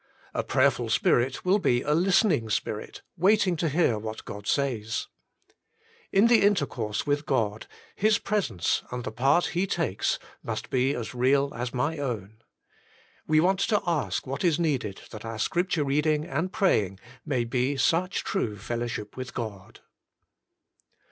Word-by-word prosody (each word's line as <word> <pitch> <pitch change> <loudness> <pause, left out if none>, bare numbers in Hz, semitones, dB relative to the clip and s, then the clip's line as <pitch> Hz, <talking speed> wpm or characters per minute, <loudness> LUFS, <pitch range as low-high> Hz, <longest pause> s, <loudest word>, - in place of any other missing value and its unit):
A - - -1
prayerful - - +2
spirit 130 +6 +2
will 190 +3 +4
be 125 -8 +2
a 150 - +1
listening 175 - +3
spirit - - -3
waiting 195 0 +3
to 165 0 0
hear 140 -8 +2
what 110 +1 -6
God 105 0 -8
says. 120 -5 -1 1.1
In 195 +3 +5
the 235 -1 +5
inter 200 -7 +3
course 110 -3 -3
with 145 0 0
God 110 -5 0 0.3
His 215 +1 +3
presence 175 - 0
and 125 0 -4
the 110 - -4
part 135 +9 +3
He 180 +3 +1
takes 160 - 0 0.2
must - - -5
be 130 +2 +2
as 115 -1 -5
real 135 +3 +2
as 120 +1 -4
my 145 +5 -1
own. 110 -5 -4 0.9
We 155 0 +4
want 185 +3 +3
to 205 +1 +2
ask 170 -4 -1
what 135 +5 -4
is 170 -3 +2
needed 130 - -1
that 110 - -8
our 115 -1 -5
Scripture 175 - 0
reading 150 +2 +1
and 160 +7 -2
praying 105 - +1 0.2
may 130 -6 0
be 125 +3 0
such 170 +8 +1
true 115 - -2
fellowship 115 0 -4
with 130 0 -7
God. 105 -5 -6
140 Hz, 155 wpm, -27 LUFS, 115-175 Hz, 1.1 s, In